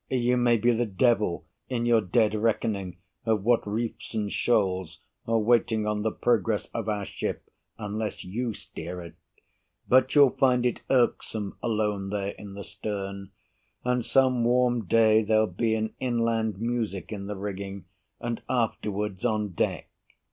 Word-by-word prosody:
You 125 Hz, -1 st, +2 dB
may 120 Hz, -1 st, +3 dB
be 120 Hz, +3 st, +3 dB
the 120 Hz, +1 st, 0 dB
devil 105 Hz, -3 st, +1 dB, 0.2 s
In 120 Hz, -2 st, -1 dB
your 120 Hz, -2 st, +4 dB
dead 105 Hz, +3 st, +2 dB
reckoning 105 Hz, -4 st, -1 dB, 0.3 s
of 110 Hz, -3 st, +1 dB
what 120 Hz, -1 st, +2 dB
reefs 115 Hz, +2 st, -4 dB
and 105 Hz, -2 st, -1 dB
shoals 95 Hz, -7 st, 0 dB, 0.3 s
Are 115 Hz, 0 st, +2 dB
waiting 110 Hz, -1 st, +2 dB
on 105 Hz, 0 st, -1 dB
the 110 Hz, -, +1 dB
progress 110 Hz, -2 st, +1 dB
of 110 Hz, -2 st, -3 dB
our 105 Hz, -2 st, -1 dB
ship -, -, -4 dB, 0.3 s
Unless 105 Hz, 0 st, -4 dB
you 110 Hz, +4 st, -3 dB
steer 90 Hz, +2 st, -7 dB
it, 85 Hz, -, -10 dB, 0.7 s
but 130 Hz, +2 st, +4 dB
you'll 140 Hz, -3 st, +7 dB
find 125 Hz, -2 st, +2 dB
it 125 Hz, -, 0 dB
irksome 115 Hz, -5 st, +1 dB
Alone 105 Hz, -3 st, -1 dB
there 100 Hz, -1 st, -2 dB
in 100 Hz, -1 st, -9 dB
the 100 Hz, -, -6 dB
stern; 100 Hz, -2 st, -5 dB, 0.6 s
and 125 Hz, -1 st, +1 dB
some 130 Hz, -2 st, +3 dB
warm 120 Hz, -1 st, +2 dB
day 110 Hz, +2 st, +5 dB
There'll 110 Hz, 0 st, +3 dB
be 110 Hz, +4 st, 0 dB
an 110 Hz, 0 st, -2 dB
inland 115 Hz, -4 st, 0 dB
music 115 Hz, -5 st, -2 dB
in 100 Hz, -2 st, -5 dB
the 105 Hz, -, -4 dB
rigging, 100 Hz, -1 st, -5 dB, 0.3 s
And 120 Hz, -1 st, -3 dB
afterwards 105 Hz, -5 st, -1 dB
on 105 Hz, -1 st, +1 dB
deck. 90 Hz, -, -1 dB
110 Hz, 155 wpm, -27 LUFS, 100-120 Hz, 0.7 s, you'll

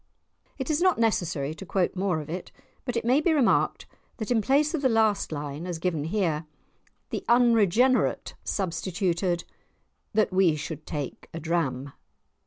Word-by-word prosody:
It 265 Hz, +2 st, -2 dB
is 305 Hz, +2 st, +1 dB
not 370 Hz, -1 st, +4 dB
necessary 170 Hz, -10 st, 0 dB
to 165 Hz, -, -9 dB
quote 190 Hz, 0 st, 0 dB
more 185 Hz, -3 st, 0 dB
of 150 Hz, -, -10 dB
it, 175 Hz, +3 st, -6 dB, 0.3 s
but 245 Hz, -2 st, -2 dB
it 230 Hz, -, -2 dB
may 260 Hz, +5 st, +4 dB
be 325 Hz, +1 st, +3 dB
remarked 275 Hz, -6 st, +2 dB, 0.3 s
that 220 Hz, 0 st, -4 dB
in 230 Hz, -2 st, +3 dB
place 285 Hz, +7 st, +2 dB
of 320 Hz, -, -1 dB
the 260 Hz, -, +3 dB
last 220 Hz, -5 st, +2 dB
line 150 Hz, +2 st, -5 dB
as 175 Hz, -2 st, -3 dB
given 160 Hz, -3 st, -1 dB
here, 165 Hz, -4 st, -1 dB, 0.6 s
the -, -, -3 dB
unregenerate 240 Hz, +1 st, +3 dB
substituted, 180 Hz, -1 st, -1 dB, 0.7 s
"That 215 Hz, -3 st, +2 dB
we 185 Hz, -4 st, +4 dB
should 155 Hz, +1 st, -6 dB
take 145 Hz, -4 st, -5 dB
a -, -, -3 dB
dram." 145 Hz, -5 st, -2 dB
185 Hz, 160 wpm, -27 LUFS, 160-235 Hz, 0.7 s, not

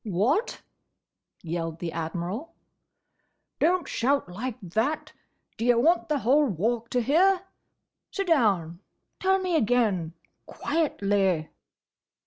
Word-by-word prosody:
"What!" 230 Hz, -, 0 dB, 0.8 s
yelled 165 Hz, -1 st, -3 dB
the 170 Hz, -1 st, -4 dB
Admiral. 175 Hz, -, -4 dB, 1.0 s
"Don't 350 Hz, -1 st, +2 dB
shout 275 Hz, +1 st, 0 dB
like 225 Hz, +7 st, -5 dB
that! 220 Hz, -, -2 dB, 0.4 s
D' 230 Hz, -, -2 dB
ye 245 Hz, -, +5 dB
want 325 Hz, +9 st, +2 dB
the 300 Hz, -, +2 dB
whole 280 Hz, +4 st, +3 dB
Walk 230 Hz, +4 st, -1 dB
to 250 Hz, -, +1 dB
hear?—Sit 380 Hz, -, -1 dB
down. 200 Hz, -, +2 dB, 0.4 s
Tell 380 Hz, 0 st, +3 dB
me 370 Hz, -2 st, -1 dB
again: 215 Hz, -, +1 dB, 0.3 s
quietly!" 200 Hz, -, 0 dB
235 Hz, 105 wpm, -26 LUFS, -, 1.0 s, ye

